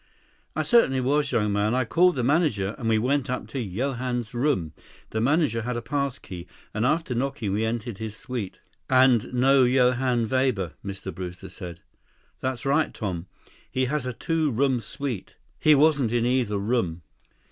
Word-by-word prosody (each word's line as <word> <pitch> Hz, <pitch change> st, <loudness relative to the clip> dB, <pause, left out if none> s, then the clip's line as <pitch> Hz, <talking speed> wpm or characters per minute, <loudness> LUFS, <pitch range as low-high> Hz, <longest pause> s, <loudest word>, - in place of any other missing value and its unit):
"I -, -, 0 dB
certainly 230 Hz, -, +4 dB
was, 140 Hz, +3 st, +1 dB
young 105 Hz, -4 st, +1 dB
man. 105 Hz, +3 st, +1 dB
I 130 Hz, -1 st, +1 dB
called 180 Hz, +8 st, +4 dB
for 130 Hz, -, 0 dB
the -, -, -2 dB
manager, 120 Hz, -, +1 dB
and 115 Hz, -3 st, -1 dB
we 110 Hz, -, +4 dB
went 135 Hz, +4 st, +1 dB
up 125 Hz, -, -2 dB
to 135 Hz, -3 st, -3 dB
Johann's 120 Hz, +2 st, -2 dB
room. 120 Hz, -, 0 dB, 0.4 s
The 110 Hz, -, -1 dB
manager 135 Hz, -3 st, +2 dB
had 125 Hz, +1 st, -3 dB
a -, -, -3 dB
pass 140 Hz, +2 st, -1 dB
key, 90 Hz, -1 st, -9 dB, 0.3 s
and, 110 Hz, +3 st, +1 dB
after 155 Hz, -2 st, 0 dB
knocking, 120 Hz, -5 st, -2 dB
we 105 Hz, +2 st, 0 dB
entered 115 Hz, -2 st, -3 dB
his 110 Hz, -1 st, -5 dB
suite." 120 Hz, -7 st, -5 dB, 0.3 s
"And 130 Hz, -3 st, +4 dB
no 130 Hz, +2 st, +4 dB
Johann 125 Hz, -1 st, +2 dB
Weber," 125 Hz, -, 0 dB
Mr. 95 Hz, -1 st, -6 dB
Brewster 90 Hz, +1 st, -7 dB
said. 85 Hz, -2 st, -8 dB, 0.6 s
"That's 130 Hz, -1 st, -3 dB
right, 145 Hz, +3 st, +2 dB
Tom. 95 Hz, -4 st, -4 dB, 0.4 s
He 130 Hz, 0 st, 0 dB
has 135 Hz, 0 st, -2 dB
a -, -, -1 dB
two 160 Hz, +4 st, 0 dB
room 130 Hz, +1 st, +1 dB
suite. 125 Hz, -6 st, -5 dB, 0.2 s
He 155 Hz, -1 st, +6 dB
wasn't 145 Hz, -5 st, +3 dB
in 120 Hz, -1 st, +1 dB
either 120 Hz, -5 st, +1 dB
room." 100 Hz, -6 st, -1 dB
125 Hz, 175 wpm, -25 LUFS, 110-135 Hz, 0.6 s, He